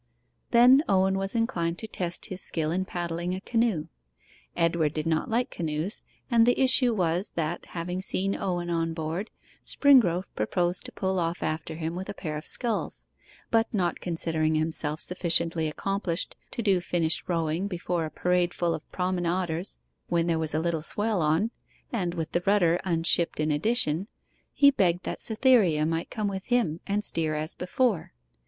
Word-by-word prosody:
Then 250 Hz, +4 st, +7 dB
Owen 190 Hz, 0 st, +3 dB
was 195 Hz, +3 st, -1 dB
inclined 175 Hz, -8 st, 0 dB
to 220 Hz, -, -6 dB
test 175 Hz, -5 st, -2 dB
his 185 Hz, -1 st, -4 dB
skill 155 Hz, -2 st, -2 dB
in 185 Hz, +2 st, -1 dB
paddling 175 Hz, 0 st, -3 dB
a -, -, -4 dB
canoe. 225 Hz, -7 st, 0 dB, 0.7 s
Edward 165 Hz, -3 st, +1 dB
did 155 Hz, 0 st, -2 dB
not 160 Hz, -1 st, 0 dB
like 240 Hz, +2 st, 0 dB
canoes, 160 Hz, +5 st, -2 dB, 0.3 s
and 230 Hz, -1 st, +5 dB
the 245 Hz, -, +3 dB
issue 255 Hz, -1 st, +5 dB
was, 180 Hz, 0 st, 0 dB
that, 165 Hz, +1 st, -2 dB
having 180 Hz, +2 st, -4 dB
seen 195 Hz, +1 st, 0 dB
Owen 175 Hz, -2 st, -2 dB
on 165 Hz, -1 st, -1 dB
board, 165 Hz, +6 st, -3 dB, 0.3 s
Springrove 235 Hz, -, +4 dB
proposed 175 Hz, +11 st, 0 dB
to -, -, -7 dB
pull 190 Hz, -1 st, -1 dB
off 170 Hz, 0 st, -2 dB
after 160 Hz, +1 st, -3 dB
him 160 Hz, 0 st, -3 dB
with 185 Hz, +2 st, -6 dB
a -, -, -5 dB
pair 155 Hz, -4 st, -5 dB
of 150 Hz, -, -6 dB
sculls; 235 Hz, -3 st, 0 dB, 0.5 s
but 225 Hz, 0 st, +2 dB
not 175 Hz, -4 st, 0 dB
considering 160 Hz, -2 st, 0 dB
himself 155 Hz, -1 st, +1 dB
sufficiently 170 Hz, -2 st, +1 dB
accomplished 185 Hz, +2 st, -2 dB
to 235 Hz, -, -4 dB
do 195 Hz, -4 st, +3 dB
finished 170 Hz, -2 st, 0 dB
rowing 165 Hz, +2 st, 0 dB
before 175 Hz, -2 st, -2 dB
a -, -, -5 dB
parade 180 Hz, +1 st, 0 dB
full 170 Hz, -1 st, 0 dB
of 160 Hz, -1 st, -8 dB
promenaders 180 Hz, -1 st, -2 dB, 0.3 s
when 170 Hz, -1 st, +1 dB
there 165 Hz, -1 st, +1 dB
was 160 Hz, -1 st, -1 dB
a -, -, +2 dB
little 165 Hz, -1 st, -1 dB
swell 210 Hz, +3 st, 0 dB
on, 160 Hz, +9 st, +1 dB, 0.4 s
and 180 Hz, -6 st, -1 dB
with 160 Hz, -2 st, -4 dB
the 175 Hz, -, 0 dB
rudder 180 Hz, -4 st, +4 dB
unshipped 170 Hz, -1 st, +2 dB
in 155 Hz, 0 st, +1 dB
addition, 175 Hz, +1 st, +1 dB, 0.4 s
he 280 Hz, 0 st, +5 dB
begged 180 Hz, -8 st, +1 dB
that -, -, -4 dB
Cytherea 220 Hz, -, +3 dB
might 165 Hz, +1 st, -2 dB
come 215 Hz, -2 st, -2 dB
with 190 Hz, -1 st, -5 dB
him 230 Hz, -11 st, +1 dB
and 205 Hz, +1 st, 0 dB
steer 160 Hz, -5 st, -1 dB
as 155 Hz, +1 st, -2 dB
before. 205 Hz, -, -1 dB
175 Hz, 170 wpm, -27 LUFS, 165-195 Hz, 0.7 s, Then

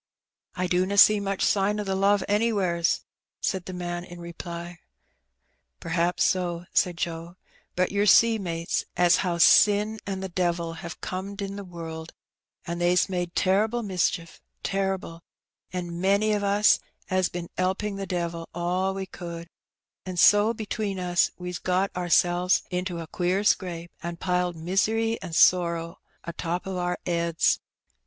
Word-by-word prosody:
''I 180 Hz, -, 0 dB
dunna 185 Hz, +3 st, 0 dB
see 210 Hz, +1 st, +8 dB
much 195 Hz, -1 st, -2 dB
sign 205 Hz, +1 st, +2 dB
o' -, -, -1 dB
the 195 Hz, -1 st, -2 dB
love 200 Hz, +1 st, +3 dB
anywheres/' 200 Hz, -6 st, +1 dB, 0.4 s
said 190 Hz, -3 st, -2 dB
the -, -, -6 dB
man 175 Hz, -1 st, -4 dB
in 175 Hz, -1 st, -11 dB
reply. 170 Hz, 0 st, -7 dB, 1.0 s
'^Pr'aps 170 Hz, +1 st, -1 dB
so," 175 Hz, -2 st, 0 dB
said 180 Hz, -3 st, +2 dB
Joe. 170 Hz, +1 st, -4 dB, 0.4 s
''But 185 Hz, 0 st, +1 dB
yer 205 Hz, +1 st, +1 dB
see, 225 Hz, +3 st, +6 dB
mates, 170 Hz, -3 st, -2 dB
as 175 Hz, -1 st, +5 dB
how 175 Hz, -2 st, -1 dB
sin 210 Hz, +4 st, +5 dB
an' 190 Hz, -1 st, -3 dB
the 190 Hz, -, -3 dB
devil 170 Hz, -2 st, -1 dB
have 170 Hz, -, -8 dB
corned 190 Hz, +2 st, -5 dB
in 200 Hz, 0 st, -4 dB
th' 200 Hz, -2 st, -7 dB
world, 165 Hz, -2 st, -8 dB, 0.5 s
an' 170 Hz, +1 st, -4 dB
they's 175 Hz, +2 st, +3 dB
made 175 Hz, -2 st, -3 dB
terrible 215 Hz, +5 st, +2 dB
mischief, 180 Hz, -4 st, -2 dB, 0.2 s
terrible, 190 Hz, -4 st, -2 dB, 0.5 s
and 175 Hz, -1 st, -5 dB
many 200 Hz, +3 st, +3 dB
o' 210 Hz, -, +1 dB
us 205 Hz, +1 st, +4 dB, 0.3 s
'as 185 Hz, -1 st, +2 dB
bin 175 Hz, -1 st, -6 dB
'elping 195 Hz, +2 st, -1 dB
the 195 Hz, 0 st, -5 dB
devil 170 Hz, -2 st, -3 dB
all 180 Hz, +2 st, -1 dB
wc 190 Hz, -1 st, -6 dB
could, 170 Hz, -1 st, -7 dB, 0.5 s
an' 185 Hz, -1 st, -6 dB
so 205 Hz, +5 st, +6 dB
between 215 Hz, -3 st, -3 dB
us 180 Hz, -1 st, +2 dB
we's 180 Hz, 0 st, -5 dB
got 185 Hz, +2 st, 0 dB
oursels 180 Hz, 0 st, +2 dB
into 180 Hz, -1 st, -2 dB
a 165 Hz, -, -5 dB
queer 180 Hz, +4 st, -1 dB
scrape, 175 Hz, -4 st, 0 dB
an' 170 Hz, 0 st, -5 dB
piled 180 Hz, -1 st, 0 dB
misery 220 Hz, +7 st, 0 dB
an' 175 Hz, -3 st, -7 dB
sorrow 170 Hz, -1 st, +3 dB, 0.3 s
o' 170 Hz, -, -4 dB
top 170 Hz, +2 st, -3 dB
o' 190 Hz, -1 st, -3 dB
our 180 Hz, 0 st, -1 dB
'eads. 170 Hz, -1 st, +1 dB
180 Hz, 155 wpm, -26 LUFS, 170-195 Hz, 1.0 s, see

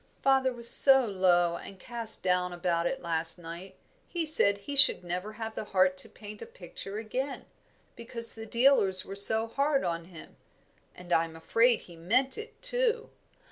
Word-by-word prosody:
"Father 265 Hz, -1 st, +1 dB
was 235 Hz, -1 st, -1 dB
so 265 Hz, +1 st, +8 dB
low 175 Hz, -4 st, 0 dB
and 195 Hz, -, -12 dB
cast 230 Hz, 0 st, -1 dB
down 180 Hz, 0 st, -1 dB
about 175 Hz, -1 st, -2 dB
it 270 Hz, -, -5 dB
last 165 Hz, 0 st, -2 dB
night, 175 Hz, +3 st, -11 dB, 0.3 s
he 340 Hz, -2 st, -4 dB
said 200 Hz, -10 st, +3 dB
he 280 Hz, +8 st, -8 dB
should 270 Hz, -9 st, +5 dB
never 180 Hz, +4 st, -6 dB
have 225 Hz, 0 st, -8 dB
the 215 Hz, -, -7 dB
heart 185 Hz, -2 st, 0 dB
to -, -, -13 dB
paint 210 Hz, 0 st, -13 dB
a -, -, -9 dB
picture 335 Hz, -, -11 dB
again, 255 Hz, +5 st, -6 dB, 0.5 s
because 230 Hz, 0 st, -3 dB
the 225 Hz, 0 st, -10 dB
dealers 235 Hz, -6 st, +1 dB
were 195 Hz, -, -9 dB
so 220 Hz, +3 st, +4 dB
hard 275 Hz, +4 st, -2 dB
on 170 Hz, -1 st, -4 dB
him; 170 Hz, -3 st, -15 dB, 0.6 s
and 180 Hz, -1 st, -7 dB
I 165 Hz, -, +2 dB
am 165 Hz, -1 st, -13 dB
afraid 230 Hz, +8 st, 0 dB
he 175 Hz, -, -15 dB
meant 235 Hz, +11 st, -1 dB
it, 440 Hz, +1 st, -10 dB
too. -, -, 0 dB
210 Hz, 180 wpm, -27 LUFS, 180-260 Hz, 0.6 s, so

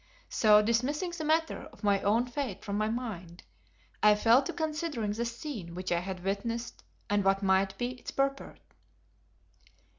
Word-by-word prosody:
So, 210 Hz, -1 st, +5 dB
dismissing 260 Hz, -, 0 dB
the 340 Hz, -2 st, -5 dB
matter 320 Hz, +1 st, 0 dB
of -, -, -19 dB
my 200 Hz, -1 st, +3 dB
own 225 Hz, +4 st, +2 dB
fate 245 Hz, -5 st, -4 dB
from 200 Hz, -1 st, -3 dB
my 215 Hz, +1 st, 0 dB
mind, 195 Hz, -8 st, -5 dB, 0.6 s
I 210 Hz, 0 st, +6 dB
fell 230 Hz, +5 st, +5 dB
to 270 Hz, -, -4 dB
considering 305 Hz, -9 st, -2 dB
the 230 Hz, +3 st, -2 dB
scene 235 Hz, -, -6 dB
which 185 Hz, 0 st, -4 dB
I 170 Hz, -, +2 dB
had 185 Hz, 0 st, -6 dB
witnessed 230 Hz, +5 st, -3 dB, 0.2 s
and 205 Hz, 0 st, +1 dB
what 195 Hz, +1 st, +2 dB
might 190 Hz, 0 st, +2 dB
be 245 Hz, +3 st, -2 dB
its 255 Hz, -1 st, -9 dB
purport. 275 Hz, 0 st, -2 dB
225 Hz, 160 wpm, -30 LUFS, 195-260 Hz, 0.6 s, I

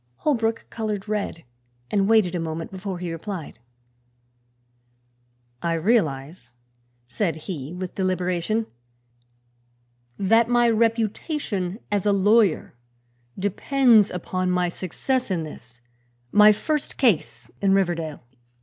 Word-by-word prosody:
Holbrook 225 Hz, -, 0 dB
colored 215 Hz, -3 st, -3 dB
red 205 Hz, -5 st, -3 dB, 0.5 s
and 200 Hz, 0 st, +2 dB
waited 215 Hz, -6 st, +4 dB
a 175 Hz, -, -1 dB
moment 165 Hz, 0 st, -4 dB
before 190 Hz, -1 st, -5 dB
he 175 Hz, -1 st, -4 dB
replied. 165 Hz, -, -6 dB, 2.0 s
"I 170 Hz, -1 st, 0 dB
realize," 155 Hz, -, 0 dB, 0.5 s
said 165 Hz, -, -1 dB
he, 155 Hz, -3 st, -6 dB
with 180 Hz, 0 st, -6 dB
deliberation, 185 Hz, +3 st, 0 dB, 1.5 s
"that 225 Hz, +4 st, +3 dB
my 240 Hz, -1 st, +4 dB
reputation 225 Hz, -, -1 dB
as 205 Hz, -1 st, 0 dB
a -, -, +5 dB
lawyer 205 Hz, -2 st, +3 dB, 0.6 s
depends 220 Hz, +2 st, +3 dB
upon 185 Hz, +1 st, -2 dB
my 180 Hz, -1 st, +1 dB
success 245 Hz, +9 st, -2 dB
in 175 Hz, -4 st, -1 dB
this, 125 Hz, -5 st, -11 dB, 0.5 s
my 210 Hz, 0 st, +8 dB
first 285 Hz, +8 st, -2 dB
case 225 Hz, -, +1 dB
in 195 Hz, -1 st, +4 dB
Riverdale. 170 Hz, -7 st, -1 dB
195 Hz, 105 wpm, -24 LUFS, 170-220 Hz, 2.0 s, my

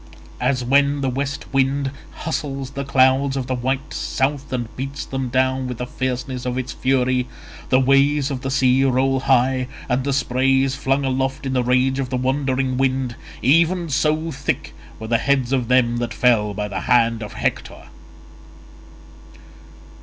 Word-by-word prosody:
As 130 Hz, -2 st, 0 dB
when 140 Hz, +3 st, +2 dB
the 135 Hz, -1 st, 0 dB
west 140 Hz, +2 st, -3 dB
wind 135 Hz, 0 st, +1 dB, 0.2 s
hustles 140 Hz, -4 st, -4 dB
the 140 Hz, 0 st, -4 dB
clouds 135 Hz, 0 st, +3 dB
of 130 Hz, -, -2 dB
the 130 Hz, -, -2 dB
white 130 Hz, +3 st, -2 dB
south 140 Hz, +1 st, -2 dB
and 120 Hz, -3 st, -4 dB
beats 135 Hz, +2 st, -5 dB
them 135 Hz, -1 st, -3 dB
down 130 Hz, +1 st, +1 dB
with 125 Hz, -2 st, -5 dB
the 125 Hz, -, -3 dB
fierceness 125 Hz, 0 st, -3 dB
of 125 Hz, 0 st, -2 dB
its 130 Hz, -1 st, -3 dB
fury—the 130 Hz, 0 st, -1 dB
waves 140 Hz, +2 st, +3 dB
of 130 Hz, -2 st, -4 dB
the 135 Hz, -, -3 dB
sea 130 Hz, 0 st, +3 dB
roll 135 Hz, 0 st, +2 dB
high, 130 Hz, -1 st, +2 dB, 0.2 s
and 125 Hz, +1 st, 0 dB
the 140 Hz, -, -1 dB
spray 135 Hz, 0 st, +2 dB
is 135 Hz, -1 st, 0 dB
flung 135 Hz, +1 st, 0 dB
aloft 135 Hz, +1 st, -1 dB
in 135 Hz, -, -2 dB
the 125 Hz, -1 st, +1 dB
rage 130 Hz, +2 st, +2 dB
of 130 Hz, -2 st, -2 dB
the 130 Hz, -, -1 dB
wandering 130 Hz, 0 st, 0 dB
wind—even 135 Hz, +6 st, +1 dB
so 155 Hz, +3 st, 0 dB
thick 135 Hz, 0 st, -3 dB, 0.3 s
were 110 Hz, -, -6 dB
the 115 Hz, 0 st, +1 dB
heads 135 Hz, -2 st, +1 dB
of 125 Hz, -3 st, 0 dB
them 120 Hz, -1 st, +3 dB
that 120 Hz, 0 st, -3 dB
fell 105 Hz, -5 st, +2 dB
by 105 Hz, 0 st, -2 dB
the 95 Hz, -2 st, -4 dB
hand 115 Hz, -2 st, +3 dB
of 105 Hz, -, -7 dB
Hector. -, -, -3 dB
130 Hz, 165 wpm, -21 LUFS, 125-135 Hz, 0.3 s, clouds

